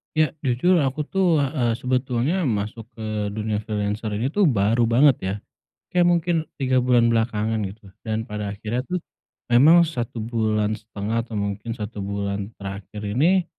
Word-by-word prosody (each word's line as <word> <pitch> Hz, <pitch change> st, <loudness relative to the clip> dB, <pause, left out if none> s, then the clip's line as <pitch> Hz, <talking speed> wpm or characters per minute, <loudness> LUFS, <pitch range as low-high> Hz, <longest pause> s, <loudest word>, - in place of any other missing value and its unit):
Ya. 155 Hz, 0 st, +3 dB
Jujur 150 Hz, +9 st, +3 dB
aku 140 Hz, +1 st, 0 dB
tuh, 175 Hz, -2 st, +2 dB
eee, 130 Hz, -4 st, 0 dB
sebetulnya 130 Hz, +7 st, 0 dB
masuk 110 Hz, 0 st, -3 dB
ke 110 Hz, -2 st, -3 dB
dunia 110 Hz, -1 st, -1 dB
freelancer 105 Hz, 0 st, -2 dB
ini 125 Hz, +7 st, -1 dB
tuh, 205 Hz, +1 st, +3 dB
baru 115 Hz, -1 st, +2 dB
banget, 130 Hz, +3 st, +5 dB
ya. 95 Hz, +1 st, -2 dB, 0.6 s
Kayak 175 Hz, -1 st, +4 dB
mungkin 175 Hz, 0 st, +2 dB, 0.2 s
3 130 Hz, -2 st, +2 dB
bulan 120 Hz, -2 st, +4 dB
belakangan, 110 Hz, -1 st, 0 dB
gitu. 100 Hz, -1 st, -14 dB
Dan 110 Hz, 0 st, -2 dB
pada 105 Hz, -2 st, -4 dB
akhirnya 115 Hz, +4 st, -2 dB
tuh, 180 Hz, -, -1 dB, 0.5 s
memang 160 Hz, +8 st, +7 dB
satu 120 Hz, -6 st, -4 dB
bulan 110 Hz, -2 st, 0 dB
setengah 110 Hz, +1 st, -3 dB
atau 115 Hz, -3 st, -7 dB
mungkin 100 Hz, +2 st, -3 dB
1 105 Hz, -1 st, -6 dB
bulan 100 Hz, +1 st, -3 dB
terakhir 100 Hz, +2 st, -7 dB
ini, 160 Hz, -, +3 dB
115 Hz, 155 wpm, -23 LUFS, 105-135 Hz, 0.6 s, memang